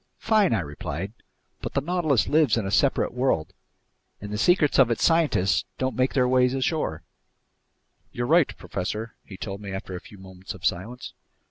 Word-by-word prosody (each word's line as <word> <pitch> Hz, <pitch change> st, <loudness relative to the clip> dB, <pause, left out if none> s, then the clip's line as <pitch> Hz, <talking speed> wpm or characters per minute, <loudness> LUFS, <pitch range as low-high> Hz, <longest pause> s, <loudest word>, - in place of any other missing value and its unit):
"Fine," 215 Hz, -, +3 dB
I 110 Hz, -5 st, +2 dB
replied, 80 Hz, +5 st, -5 dB, 0.5 s
"but -, -, -6 dB
the -, -, +4 dB
Nautilus 155 Hz, -5 st, +1 dB
lives 150 Hz, -7 st, +3 dB
in 110 Hz, -, -1 dB
a 95 Hz, -, -3 dB
separate 135 Hz, +6 st, +2 dB
world, 125 Hz, -11 st, 0 dB, 0.7 s
and 105 Hz, +1 st, -7 dB
the -, -, -2 dB
secrets 165 Hz, -1 st, +3 dB
of 130 Hz, -3 st, +6 dB
its 115 Hz, -, -1 dB
scientists 145 Hz, -, +3 dB
don't 130 Hz, 0 st, -1 dB
make 130 Hz, +1 st, 0 dB
their 125 Hz, -2 st, +3 dB
way 125 Hz, 0 st, +4 dB
ashore." 130 Hz, -, -1 dB, 1.1 s
"You're 120 Hz, -, -3 dB
right, 160 Hz, +3 st, +4 dB
professor," 105 Hz, +4 st, -4 dB
he 95 Hz, -, -11 dB
told 100 Hz, 0 st, -6 dB
me 100 Hz, -1 st, -7 dB
after 95 Hz, -1 st, -6 dB
a 90 Hz, -, -6 dB
few 105 Hz, -, -14 dB
moments 95 Hz, 0 st, -9 dB
of 90 Hz, -, -9 dB
silence. 110 Hz, +8 st, -3 dB
115 Hz, 175 wpm, -25 LUFS, 95-140 Hz, 1.1 s, of